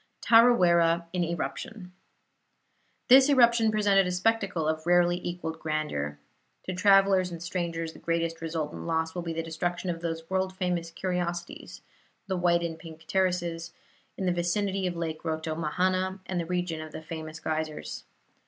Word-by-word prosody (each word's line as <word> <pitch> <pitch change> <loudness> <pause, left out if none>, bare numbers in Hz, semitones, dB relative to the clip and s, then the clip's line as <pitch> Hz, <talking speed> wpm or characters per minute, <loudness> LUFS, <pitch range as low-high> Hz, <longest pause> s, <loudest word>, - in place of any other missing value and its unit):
TARAWERA 175 -8 +5
IN 180 -1 +1
ERUPTION 170 +4 -5 1.2
This 265 +2 +8
eruption 235 -4 +5
presented 200 -3 +3
a - - -1
spectacle 185 -4 0
of 155 +1 -2
rarely 175 0 +3
equalled 175 -2 -4
grandeur. 150 - -2 0.5
To 185 - -4
travelers 195 -1 +4
and 170 - -6
strangers 170 -2 -3
the - - -13
greatest 165 0 -2
resultant 160 -1 -4
loss 160 0 0
will 175 - -3
be 170 -1 -4
the 165 0 -3
destruction 175 +2 -2
of 165 -1 -6
those 165 -1 -4
world 190 0 -1
famous 180 -3 -1
curiosities, 175 0 -4 0.4
the 190 - -2
white 175 -1 +2
and 165 -1 -4
pink 160 -1 -12
terraces, 175 -3 -1 0.4
in 190 - -2
the 180 - +2
vicinity 190 +2 0
of 175 - -3
Lake 160 -2 -4
Rotomahana 170 +4 -1
and 185 -2 -2
the 170 - -3
region 175 -3 -2
of 155 -1 -9
the 160 - -7
famous 160 0 -7
geysers. 155 - -4
175 Hz, 155 wpm, -28 LUFS, 165-185 Hz, 1.2 s, This